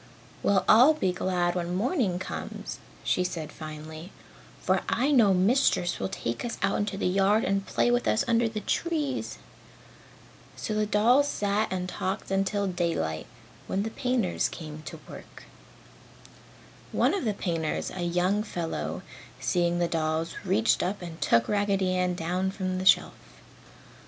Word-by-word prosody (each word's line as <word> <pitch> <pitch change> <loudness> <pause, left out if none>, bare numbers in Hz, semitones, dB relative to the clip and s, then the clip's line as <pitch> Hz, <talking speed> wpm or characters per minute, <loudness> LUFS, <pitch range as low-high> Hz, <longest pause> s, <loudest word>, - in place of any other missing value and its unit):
"Well, 195 -2 +2
I'll 255 +8 +7
be 190 -11 +1
glad 180 -1 0
when 175 0 -2
morning 220 - +1
comes!" 185 - -6 0.2
she 180 - +1
said 165 -4 -4
finally, 155 +3 -8 0.5
"for - - +1
I 275 +4 +2
know 230 -8 +5
Mistress 190 -1 +2
will 95 - -2
take 115 0 -4
us 240 - -4
out 200 +1 +1
in 195 - -6
the - - -1
yard 195 +4 +3
and 195 0 0
play 240 - +2
with 245 0 +1
us 220 - +2
under 235 -1 +3
the 215 -1 -4
trees." 305 -3 -2 1.2
So 215 - -4
the 215 0 +1
dolls 240 +7 +4
sat 205 -4 0
and 185 -1 -2
talked 185 +1 -3
until 195 +1 +1
daylight, 170 - -2 0.4
when 195 - -1
the 220 - -4
painters 250 -8 0
came 155 -2 -8
to - - -7
work. - - -12 1.5
One - - +2
of 395 - -1
the 215 -4 0
painters, 165 -5 -2
a 185 - -5
young 180 +4 +1
fellow, 175 -6 -4 0.4
seeing 175 -1 +1
the 175 0 +1
dolls, 160 0 -1
reached 200 +5 +2
up 185 +1 -2
and 165 -1 -8
took 115 0 +3
Raggedy 200 -2 +1
Ann 180 -1 +1
down 180 +3 -1
from 185 -1 -3
the 185 - -1
shelf. - - +5
190 Hz, 155 wpm, -27 LUFS, 175-215 Hz, 1.5 s, I'll